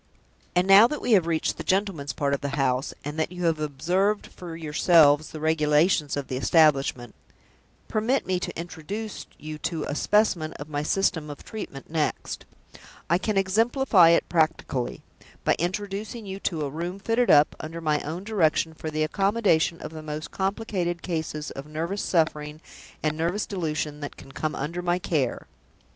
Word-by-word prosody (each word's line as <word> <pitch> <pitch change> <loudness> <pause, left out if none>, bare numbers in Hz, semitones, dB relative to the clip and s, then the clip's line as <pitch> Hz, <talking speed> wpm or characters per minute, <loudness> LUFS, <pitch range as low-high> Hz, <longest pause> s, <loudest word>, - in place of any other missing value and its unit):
And 180 +1 +4
now 200 +4 +9
that 300 +3 -4
we - - -2
have 185 -6 +5
reached 165 -2 0
the - - -5
gentleman's 190 -7 0
part 140 -1 -1
of 140 - -1
the 140 +1 -3
house, 135 0 +1
and 150 +2 -4
that 160 - 0
you 180 -1 -4
have 165 -2 +2
observed 180 +8 0
for 175 -2 -9
yourselves 155 -1 +4
the 155 - -8
regulations 155 0 +2
of 140 - -3
the 130 - -3
establishment, 135 -5 +3 0.7
permit 225 +5 0
me 185 -1 0
to 180 - -5
introduce 190 +6 -6
you 155 0 -7
to 160 -2 -2
a - - -3
specimen 175 -2 +2
of 145 +1 -9
my 145 0 -1
system 160 -1 0
of 145 - -9
treatment 140 -11 -7
next. 155 -2 -2 0.7
I 170 - +4
can 210 0 -1
exemplify 210 -1 +4
it 170 - +3
practically, 155 -6 0 0.4
by - - +3
introducing 205 +5 -3
you 195 0 -6
to 160 -6 -2
a - - -3
room 170 +5 -4
fitted 230 +4 +1
up, 145 0 +6
under 165 +2 -6
my 155 -2 +1
own 165 +5 -5
direction, 170 -6 +1
for 160 0 -6
the 155 0 -1
accommodation 195 -1 +2
of - - -6
the 160 -1 -8
most 155 0 -6
complicated 190 -3 -2
cases 160 -3 -3
of 135 +2 -8
nervous 165 +6 -3
suffering 155 -3 0 0.4
and 155 -1 +1
nervous 170 +6 -1
delusion 155 -5 -3
that 145 -1 -7
can 135 - -13
come 155 +3 -3
under 165 +6 -3
my 175 0 +1
care." 155 -7 -1
165 Hz, 175 wpm, -26 LUFS, 150-190 Hz, 0.7 s, now